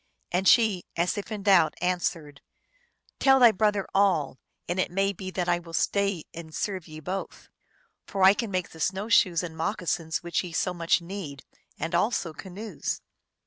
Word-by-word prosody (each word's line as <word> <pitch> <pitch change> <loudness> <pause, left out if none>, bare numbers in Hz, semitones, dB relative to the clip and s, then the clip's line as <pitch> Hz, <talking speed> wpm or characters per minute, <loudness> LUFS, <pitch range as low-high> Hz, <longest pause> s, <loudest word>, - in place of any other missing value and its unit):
And 185 +2 +1
she, 215 -7 +5
as 170 +2 +1
if 205 +2 -6
in 210 -2 -4
doubt, 190 -6 +5
answered, 165 -5 -2 0.4
" 485 -1 -39
Tell 270 -1 +5
thy 240 -2 +8
brother 205 -1 +1
all, 175 -10 +2 0.3
and 175 +2 -2
it - - +1
may 195 +2 0
be 185 0 -7
that 180 -1 -2
I 175 0 +2
will 165 -1 -8
stay 200 -4 0
and 160 -2 -9
serve 190 -5 -3
ye 155 -1 -9
both. 185 +5 -6 0.6
For 195 -1 -1
I 190 +1 +8
can 230 +1 -3
make 185 -2 -2
the 160 - -13
snow 190 +6 -1
shoes 180 -5 +4
and 165 -2 -6
moccasins 165 -2 -2
which 175 +1 -1
ye 175 -2 -7
so 180 +2 0
much 170 0 +1
need, 170 -7 -7 0.3
and 165 +3 -4
also 175 -2 0
canoes." 195 +7 -5
185 Hz, 185 wpm, -27 LUFS, 165-200 Hz, 0.6 s, thy